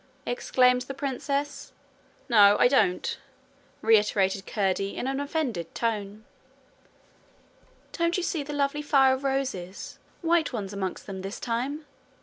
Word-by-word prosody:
exclaimed 250 - +2
the 270 +2 -6
princess. 280 +1 -3 0.5
'No, 205 -5 +6
I - - +7
don't,' 215 -9 +1 0.6
reiterated 205 -3 +3
Curdie, 195 -1 -1
in - - -3
an 270 +1 -1
offended 280 - -3
tone. 215 -2 -3 1.7
'Don't 335 +1 0
you 365 - -1
see 335 -3 -1
the 290 +1 -6
lovely 285 0 0
fire 270 -3 +4
of 265 +1 -4
roses 260 -10 -3 0.2
white 330 -1 +2
ones 205 -5 -4
amongst 190 -2 -4
them 190 -2 -6
this 195 +3 -6
time?' 260 +6 -3
250 Hz, 130 wpm, -27 LUFS, 200-280 Hz, 1.7 s, I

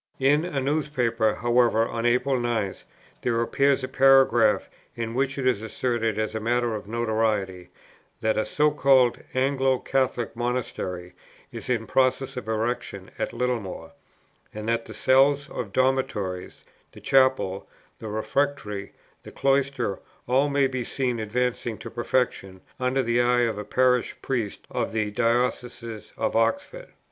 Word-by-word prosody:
"In" 145 +3 +3
[a 150 -6 -2
newspaper] 130 -6 0
"however, 120 -1 +3
of 115 0 -3
April 125 +2 +2
9, 115 -5 -1 0.5
there 115 -2 0
appears 135 +3 +2
a - - -1
paragraph 135 -5 +4 0.3
in 115 -1 -4
which 135 +2 -1
it 135 - -2
is 125 -5 +2
asserted, 115 -1 -1
as 110 0 -1
a 110 - -2
matter 120 +1 0
of 105 -2 -6
notoriety, 110 -5 -1 0.5
that 110 0 +1
a 110 - +1
'so 150 +7 +2
called 135 -4 +4 0.2
Anglo 135 0 +2
Catholic 125 -3 -1
Monastery 115 -7 -3 0.4
is - - -8
in 115 -3 0
process 130 +2 +1
of 125 - -6
erection 110 -3 -3
at - - -1
Littlemore, 110 -10 -3 0.6
and 105 0 -7
that 115 0 0
the - - -9
cells 140 +2 +3
of 110 -5 -5
dormitories, 130 -8 -1 0.3
the - - -12
chapel, 130 -8 +2 0.3
the 110 - -7
refectory, 110 -1 -2 0.3
the - - -12
cloisters 135 -6 0 0.3
all 135 +4 +2
may 140 -1 +2
be 130 -2 -2
seen 125 -2 -2
advancing 115 +1 -2
to 110 - -9
perfection, 115 -6 -1 0.2
under 130 +1 +1
the 120 +1 +2
eye 120 0 +3
of 115 -3 0
a - - -4
Parish 125 +3 +1
Priest 115 -6 -3
of - - -2
the 110 -2 -1
Diocese 115 0 -1
of - - -1
Oxford.' 285 - -1
120 Hz, 145 wpm, -25 LUFS, 110-130 Hz, 0.6 s, paragraph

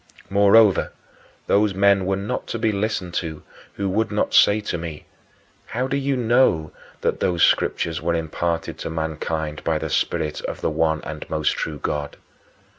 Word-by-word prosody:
Moreover, 100 +1 +5 0.5
those 100 -1 +2
men 100 -1 +3
were 95 - +1
not 100 +6 -4
to - - -3
be 110 -1 +1
listened 100 -3 -2
to 80 -3 -7 0.3
who 100 - -3
would 110 +3 0 0.2
say 105 +1 +6
to 105 - -4
me, 80 -3 -7 0.6
"How 125 +2 -2
do 135 - -1
you 140 -1 0
know 120 -10 +2 0.3
that - - 0
those 85 -2 +1
Scriptures 80 -1 +1
were 85 +1 0
imparted 85 +1 -2
to - - -4
mankind 80 -1 -3
by - - +1
the - - -4
Spirit 75 -1 -1
of - - -5
the - - 0
one 80 0 0
and - - -7
most 75 -1 +1
true 75 -2 -3
God?" 75 0 -3
90 Hz, 165 wpm, -22 LUFS, 80-105 Hz, 0.6 s, say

